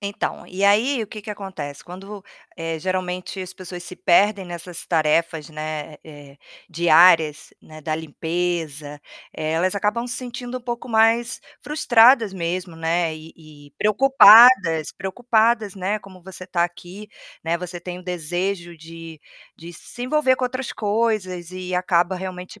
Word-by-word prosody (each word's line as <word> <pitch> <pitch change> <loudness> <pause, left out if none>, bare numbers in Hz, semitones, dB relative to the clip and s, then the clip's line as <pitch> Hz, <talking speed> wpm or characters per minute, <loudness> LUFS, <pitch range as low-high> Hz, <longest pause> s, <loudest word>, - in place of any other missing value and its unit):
Então, 200 0 -4
e 195 +2 -3
aí 225 +6 +3
o 215 - -8
que 215 - -8
que 215 - -13
acontece, 185 -9 -7
quando 185 +2 -11
vu 205 -1 -9 0.3
eh, 165 -1 -4
geralmente 185 +2 -4
as 185 0 -7
pessoas 180 -1 -9
se 175 +1 -10
perdem 200 +2 +3
nessas 175 0 -8
tarefas, 160 -1 0
né, 155 0 -6
eh, 145 -3 -14 0.3
diárias, 165 -2 +4
né, 155 0 -13
da 155 +1 -3
limpeza, 160 -2 -4 0.3
elas 160 +4 -1
acabam 210 +4 -1
se 245 - -4
sentindo 245 0 -6
um - - -17
pouco 240 0 -6
mais 230 +2 +2 0.2
frustradas 240 -6 +4
mesmo, 175 -1 -4
né, 165 0 0
e 155 +1 -12
e 150 -3 -17
preocupadas, 215 - +6
preocupadas, 220 +1 0
né, 195 +3 -2
como 185 -3 -15
você 185 0 -9
tá 175 -1 0
aqui, 175 +4 -7 0.4
né, 165 +1 0
você 180 0 -7
tem 180 0 -7
o - - -12
desejo 175 +1 -3
de 165 0 -11 0.4
de 170 +1 -11
se 240 +7 -10
envolver 260 -1 +2
com 255 - -2
outras 255 0 -4
coisas 205 -5 -1
e 185 0 -5
acaba 180 0 +1
realmente 185 +2 -8
180 Hz, 150 wpm, -22 LUFS, 165-210 Hz, 0.4 s, preocupadas